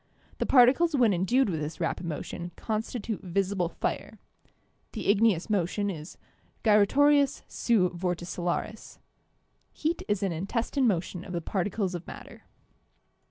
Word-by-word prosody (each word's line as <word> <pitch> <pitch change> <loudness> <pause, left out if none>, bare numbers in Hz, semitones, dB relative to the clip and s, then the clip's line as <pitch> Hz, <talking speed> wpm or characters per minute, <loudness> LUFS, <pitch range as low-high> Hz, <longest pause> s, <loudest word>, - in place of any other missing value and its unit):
The - - -1
particles 280 +6 +5
when 235 -6 +4
endued 220 +9 +2
with 165 -5 -2
this 150 +1 -5
rapid 175 - -2
motion 170 +2 -5
constitute 220 0 -3
visible 185 -1 -1
fire.... - - -4 0.8
The - - -5
igneous 205 -4 +2
motion 200 0 0
is 155 -3 -9 0.5
'gyratorius 275 +7 +4
seu 210 -7 +2
vorticillaris.'... 175 +3 -3 0.7
Heat 320 +2 -2
is 205 -1 0
an 195 - 0
intestine 230 - -1
motion 180 -2 -1
of 185 - -8
the 170 - -1
particles 195 +2 -2
of 175 -1 -6
matter." - - -11
200 Hz, 125 wpm, -28 LUFS, 175-230 Hz, 0.8 s, particles